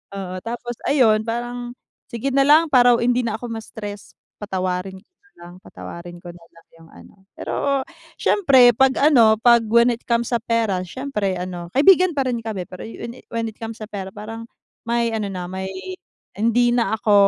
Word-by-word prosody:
oo, 185 -2 -5
tapos 240 +1 -5
ayun 225 -7 +4
parang, 240 +1 -4 0.4
sige 235 +4 -2
nalang 295 +4 +5
para 245 -2 +6
hindi 245 +1 +1
na 225 - -2
ako 245 - -8
ma-stress, 210 -2 -8 0.3
patawarin 185 -1 -3
ko - - -36 0.3
nalang, 175 0 -12
patawarin 170 - -10
ko 175 - -9
nalang 170 -1 -19
yung 165 0 -17
ano. - - -16 0.2
Pero 275 -2 -1 0.4
syempre 265 -11 +5
pag 265 +2 +3
ano, 235 -7 +5
pag 235 0 +5
when 235 +2 +5
it 235 - -9
comes 235 +1 0
sa 235 - +2
pera 225 -5 0
syempre 210 -2 -3
ano 175 -1 -6
kaibigan 365 +4 +5
pa 270 - +1
rin 235 -2 -2
kami 200 -5 -4
pero 185 - -10
when 230 +1 -8
it - - -41
when 230 0 -2
it 220 - -15
comes 225 0 -6
sa - - -4
pera 195 -3 -6
parang, 225 +2 -8 0.4
may 235 -1 0
ano 215 -2 -2
na 180 -1 -5
may, 190 0 -5 0.7
hindi 230 +4 +2
na 230 -2 +1
ako, 215 -1 +1
230 Hz, 175 wpm, -21 LUFS, 195-245 Hz, 0.7 s, para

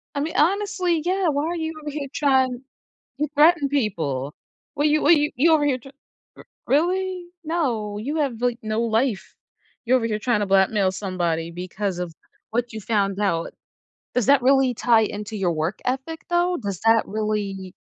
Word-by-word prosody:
I - - 0
mean, 310 +3 -2
honestly, 365 0 +1
yeah, 370 -1 +1
why 285 0 0
are 345 - -2
you 320 -1 -3
over 300 - -5
here 285 -1 -4
trying 260 -3 +2 0.6
to 300 - +1
threaten 300 -1 +5
people? 160 - -1 0.4
Well, 290 +1 +2
you 300 0 +2 0.3
you 305 +7 +4
over 300 -2 +3
here, 270 -3 +2
tr 270 - -13 0.5
r - - -13 0.2
really? 360 +4 0 0.2
No, 240 -11 -1
you 280 +9 -3
have, 265 -6 -1
like, 245 -1 0
no 215 +1 -1
life. 230 -2 -1 0.5
You're 255 +2 +4
over 235 - -2
here 215 -1 -2
trying 215 -1 +1
to - - +1
blackmail 195 0 +3
somebody 175 -4 -2
because 180 +2 -4
of 175 -2 -4 0.4
what 240 +1 -1
you 220 - -5
found 200 -2 0
out. 170 -5 -1 0.6
Does 250 -4 +1
that 280 -2 +5
really 270 0 +4
tie 230 -1 +3
into 210 +1 -4
your 180 -4 0
work 160 +4 -2
ethic 265 +6 -3
though? 350 +1 +1
Does 200 -6 -5
that 225 0 +5
really 200 -3 -3
240 Hz, 175 wpm, -23 LUFS, 205-295 Hz, 0.6 s, threaten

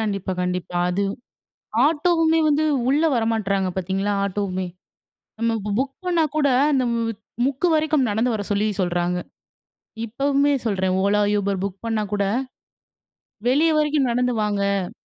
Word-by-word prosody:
கண்டிப்பா, 200 -3 -2
கண்டிப்பா, 180 0 -3
அது 195 +3 0 0.8
ஆட்டோவுமே 325 +1 +2
வந்து 300 +1 +2 0.3
உள்ள 290 +3 +3
வரமாட்றாங்க 210 -4 0
பாத்தீங்களா, 190 +2 -1
ஆட்டோவுமே. 190 -2 -2 0.7
நம்ம 230 0 +1
இப்போ 205 +1 -4
புக் 270 0 -1
பண்ணா 345 -3 +2
கூட 295 -2 +3 0.2
அந்த 265 -2 +2
மு 230 - 0 0.4
முக்கு 280 +6 0
வரைக்கும் 305 -4 +2
நடந்து 225 +4 +1
வர 215 - -2
சொல்லி 205 +1 +1 0.2
சொல்றாங்க. 175 0 0 0.9
இப்பவுமே 280 +4 +1
சொல்றேன். 190 -3 0
ஓலா, 205 +1 +2
யூபர் 200 -2 0
புக் 195 -1 -4
பண்ணா 225 -2 0
கூட, 200 -1 +1 1.3
"வெளிய 315 +5 +3
வரைக்கும் 295 -4 +1
நடந்து 250 0 +1
வாங்க" 200 -2 -1
215 Hz, 130 wpm, -22 LUFS, 195-280 Hz, 1.3 s, உள்ள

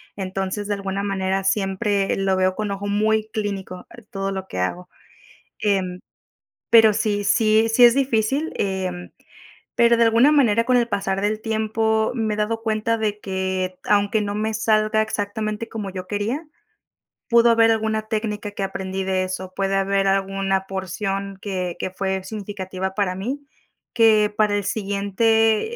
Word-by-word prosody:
Entonces 195 +1 -3
de 205 - 0
alguna 195 0 -3
manera 195 -1 -1
siempre 195 0 0
lo 195 -1 +1
veo 185 0 +1
con 210 0 -3
ojo 200 +1 -4
muy 215 +1 +1
clínico, 195 -4 -4
eh, 235 - -13
todo 195 0 -3
lo 190 -1 -5
que 90 - -5
hago. 175 - -3 0.7
Em, 185 -3 -1 0.7
pero 225 -2 +7
sí 205 -1 -1
sí 220 +1 +3
sí 245 +2 +6
es 240 -1 +7
difícil, 270 +3 0
em, 185 -2 -3 0.7
pero 235 0 +4
de 235 - +4
alguna 230 +5 +5
manera 230 -7 +4
con 250 0 +3
el 240 -1 +2
pasar 195 -3 -1
del 215 +1 -1
tiempo 220 0 0
me 220 -3 -1
he - - -9
dado 225 +2 -1
cuenta 225 0 0
de 210 -2 -2
que 190 -1 -3
aunque 205 +1 +2
no 205 0 -3
me 220 +1 -1
salga 215 0 +2
exactamente 215 +1 -3
como 210 -3 -5
yo 185 -1 -7
quería, 215 - -2 0.8
pudo 235 0 +5
haber 225 0 +5
alguna 220 -1 0
técnica 210 -1 -3
que 205 - -4
aprendí 190 0 -3
de 190 0 0
eso, 185 0 -5
puede 195 0 0
haber 195 0 +1
alguna 195 0 0
porción 195 +1 -4
que 185 -3 -3
que - - -2
fue 190 0 -2
significativa 190 -2 -5
para 200 -3 0
mí, 260 +9 -4 0.5
que 215 -3 +4
para 210 -1 +3
el 205 - -1
siguiente, 220 - +1
205 Hz, 160 wpm, -22 LUFS, 195-220 Hz, 0.8 s, pero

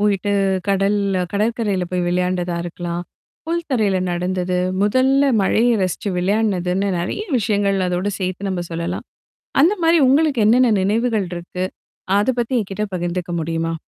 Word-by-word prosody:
போயிட்டு 205 -1 +1 0.4
கடல்ல 195 0 +1
கடற்கரையில 210 -2 0
போய் 180 -1 -1
விளையாண்டதா 180 -1 -1
இருக்கலாம், 175 0 -4 0.4
புல் 340 +1 -1
தரையில 210 -7 +2
நடந்தது, 180 +1 -1 0.2
முதல்ல 265 +6 +3
மழையை 230 +5 +3
ரசிச்சு 185 +2 -2
விளையாடுனதுன்னு 195 -1 0
நிறைய 190 - -3
விஷயங்கள் 200 -3 +1
அதோடு 180 +3 -1
சேர்த்து 185 +1 -3
நம்ம 180 -2 -2
சொல்லலாம். 170 0 -4 0.6
அந்த 355 +7 +4
மாரி 330 +1 +5
உங்களுக்கு 285 -3 +3
என்னென்ன 240 +1 +5
நினைவுகள் 215 -1 0
இருக்கு? 175 +1 -4 0.5
அத 205 - +1
பத்தி 240 +2 -1
என்கிட்ட 200 +1 -4
பகிர்ந்துக்க 175 0 -3
முடியுமா? 165 +1 -2
195 Hz, 130 wpm, -20 LUFS, 180-225 Hz, 0.6 s, மாரி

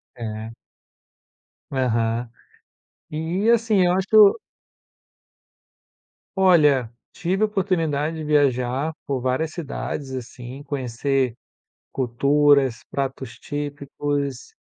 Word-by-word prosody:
É. 110 -2 -6 1.2
Aham. 115 -2 0 0.8
E 165 +8 -1
assim, 225 -4 +3
eu 175 - +3
acho 190 +1 0
que 220 - 0
eu 215 - +8 2.0
Olha, 150 - +4 0.2
tive 190 +4 -1
a - - +6
oportunidade 165 -6 -1
de 155 - -5
viajar 140 0 +1
por 135 -2 -1
várias 130 +5 -1
cidades, 145 -3 -5
assim, 125 +1 -7
conhecer 135 -2 -1 0.6
culturas, 135 0 +2
pratos 130 -3 -4
típicos, 145 -2 -4
140 Hz, 90 wpm, -23 LUFS, 125-160 Hz, 2.0 s, eu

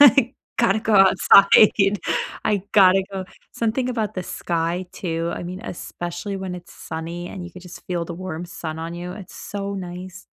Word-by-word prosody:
I 270 -3 +7 0.2
gotta 220 -3 +4
go 220 -1 +1
outside. 195 +2 +7 0.7
I 205 -3 +1
gotta 190 -1 +6
go." 190 -1 -3 0.3
Something 235 +3 0
about 225 -5 -2
the 185 - -3
sky, 170 +2 -2
too, 165 -1 -2
I - - -6
mean, 180 +2 -6
especially 175 +1 -5
when 190 -1 -4
it's 175 -1 -11
sunny, 165 +2 -6
and 185 -3 -7
you 175 - -8
could 185 - -11
just 180 -1 -11
feel 175 -2 -1
the 170 0 -6
warm 175 -2 -5
sun 160 -2 -6
on 165 +1 -5
you. 175 +1 -6
It's 195 -3 -10
so 200 0 -5
nice. 185 0 -7
185 Hz, 180 wpm, -23 LUFS, 175-200 Hz, 0.7 s, I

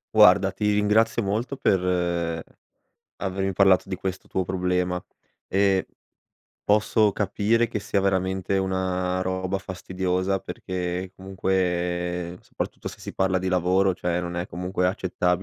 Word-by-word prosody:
Guarda, 100 -2 +7
ti 105 +2 0
ringrazio 110 +2 +3
molto 110 +7 -1
per 85 -5 +1 0.8
avermi 95 0 -1
parlato 95 0 +4
di 95 - -3
questo 95 0 -5
tuo 95 - -1
problema. 90 -1 0 0.5
Ehm 95 -1 +2 0.8
posso 105 0 +3
capire 105 +4 +1
che 110 - -2
sia 100 0 0
veramente 95 0 0
una 95 -1 -1
roba 95 +1 -1
fastidiosa, 95 0 -2
perché 90 +1 -4
comunque 90 -2 -1
soprattutto, - - -5
se - - -11
si - - -8
parla 95 -1 +2
di 95 - -4
lavoro, 95 +1 +2
cioè, 90 0 -1
non 85 0 -4
è 90 +1 -3
comunque 90 0 -2
accettabile 90 -1 0
95 Hz, 130 wpm, -25 LUFS, 90-95 Hz, 0.8 s, Guarda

